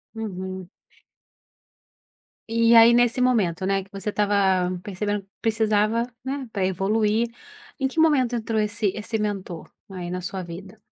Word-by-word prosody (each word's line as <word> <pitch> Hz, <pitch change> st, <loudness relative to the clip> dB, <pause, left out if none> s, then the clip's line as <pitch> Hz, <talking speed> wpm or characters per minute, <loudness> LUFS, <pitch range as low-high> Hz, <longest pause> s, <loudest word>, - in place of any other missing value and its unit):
Uhum. 190 Hz, -4 st, -5 dB, 1.8 s
E 230 Hz, 0 st, +4 dB
aí, 230 Hz, +1 st, +8 dB
nesse 245 Hz, +1 st, +3 dB
momento, 195 Hz, -8 st, +1 dB
né, 195 Hz, 0 st, 0 dB
que -, -, -24 dB
você 195 Hz, +1 st, -4 dB
estava 200 Hz, -3 st, +2 dB
percebendo 205 Hz, +1 st, -2 dB
que 195 Hz, -, -30 dB
precisava, 220 Hz, 0 st, +1 dB, 0.2 s
né, 270 Hz, 0 st, -3 dB
pra 195 Hz, -3 st, -1 dB
evoluir. 210 Hz, +4 st, +1 dB, 0.5 s
Em 270 Hz, -, +1 dB
que 315 Hz, -, -4 dB
momento 260 Hz, -7 st, +3 dB
entrou 225 Hz, -1 st, -1 dB
esse 210 Hz, 0 st, 0 dB
esse 220 Hz, +1 st, -3 dB
mentor 195 Hz, -5 st, -4 dB, 0.2 s
aí 180 Hz, -2 st, -6 dB
na 180 Hz, -, -3 dB
sua 185 Hz, +1 st, -5 dB
vida? 185 Hz, +5 st, -10 dB
210 Hz, 145 wpm, -24 LUFS, 190-230 Hz, 1.8 s, aí